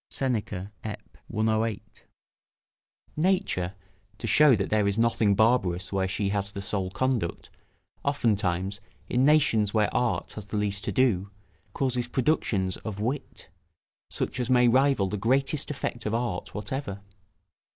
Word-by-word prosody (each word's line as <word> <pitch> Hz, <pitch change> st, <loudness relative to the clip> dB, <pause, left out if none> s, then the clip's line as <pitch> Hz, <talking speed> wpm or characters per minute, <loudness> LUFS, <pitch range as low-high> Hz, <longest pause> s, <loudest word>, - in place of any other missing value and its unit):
Seneca, 105 Hz, -7 st, -2 dB
Ep., 110 Hz, -, -8 dB
108.] 110 Hz, -1 st, -2 dB, 1.1 s
Nature, 155 Hz, -, 0 dB, 0.4 s
to 115 Hz, -, -6 dB
shew 135 Hz, +5 st, +6 dB
that 100 Hz, -2 st, -2 dB
there 105 Hz, -2 st, +3 dB
is 100 Hz, +1 st, 0 dB
nothing 115 Hz, -3 st, +3 dB
barbarous 100 Hz, -5 st, +2 dB
where 95 Hz, -1 st, +1 dB
she 100 Hz, +1 st, -1 dB
has 100 Hz, -1 st, -1 dB
the -, -, -5 dB
sole 95 Hz, -2 st, -1 dB
conduct, 120 Hz, -3 st, -2 dB, 0.5 s
oftentimes, 100 Hz, -8 st, 0 dB, 0.3 s
in 125 Hz, +1 st, +1 dB
nations 115 Hz, -8 st, +4 dB
where 105 Hz, -1 st, +2 dB
art 120 Hz, -1 st, 0 dB
has 105 Hz, -2 st, -8 dB
the 105 Hz, -, -3 dB
least 105 Hz, -1 st, -1 dB
to -, -, -1 dB
do, 105 Hz, -7 st, +2 dB, 0.4 s
causes 125 Hz, -3 st, -1 dB
productions 115 Hz, -, 0 dB
of 105 Hz, -3 st, -6 dB
wit, 130 Hz, +7 st, -4 dB, 0.6 s
such -, -, -3 dB
as 125 Hz, -1 st, -1 dB
may 125 Hz, -1 st, +5 dB
rival 130 Hz, -4 st, +3 dB
the 105 Hz, -, -3 dB
greatest 135 Hz, +7 st, +1 dB
effect 120 Hz, -5 st, -3 dB
of 105 Hz, -, 0 dB
art 115 Hz, -7 st, -3 dB
whatever. 105 Hz, -2 st, -4 dB
110 Hz, 140 wpm, -27 LUFS, 100-125 Hz, 1.1 s, shew